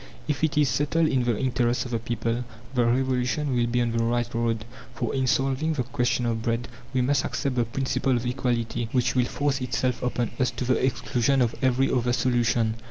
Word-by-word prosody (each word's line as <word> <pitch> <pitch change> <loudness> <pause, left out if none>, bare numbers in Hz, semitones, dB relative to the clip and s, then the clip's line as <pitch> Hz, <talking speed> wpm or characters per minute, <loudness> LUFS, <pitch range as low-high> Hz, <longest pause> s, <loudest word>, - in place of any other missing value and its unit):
If 150 -1 -2
it 160 0 +1
is 150 -1 +4
settled 150 +4 +1
in 130 -2 +1
the 120 -3 +1
interests 120 -1 0
of 125 - -7
the 115 - 0
people, 115 +1 -2 0.3
the 120 -2 +2
Revolution 130 +2 +1
will 120 -1 +2
be 120 +1 +1
on 120 - -1
the 115 0 0
right 120 0 +1
road; 115 -2 -1 0.3
for - - -2
in 130 -1 0
solving 135 +5 +1
the 135 -5 -1
question 125 -2 0
of 115 -1 -1
Bread 115 +1 -1 0.2
we 130 - +1
must 140 +3 +2
accept 135 -2 -2
the 120 -1 +2
principle 130 +2 0
of 120 - -4
equality, 120 -2 -1
which 125 -1 +2
will 125 -1 +3
force 140 +1 -1
itself 125 0 -1
upon 125 -2 -1
us 130 -1 +3
to 125 - -4
the 125 0 +1
exclusion 130 0 +1
of 120 -2 +2
every 130 0 +2
other 125 -1 +1
solution. 120 -3 +1
125 Hz, 210 wpm, -26 LUFS, 120-130 Hz, 0.3 s, is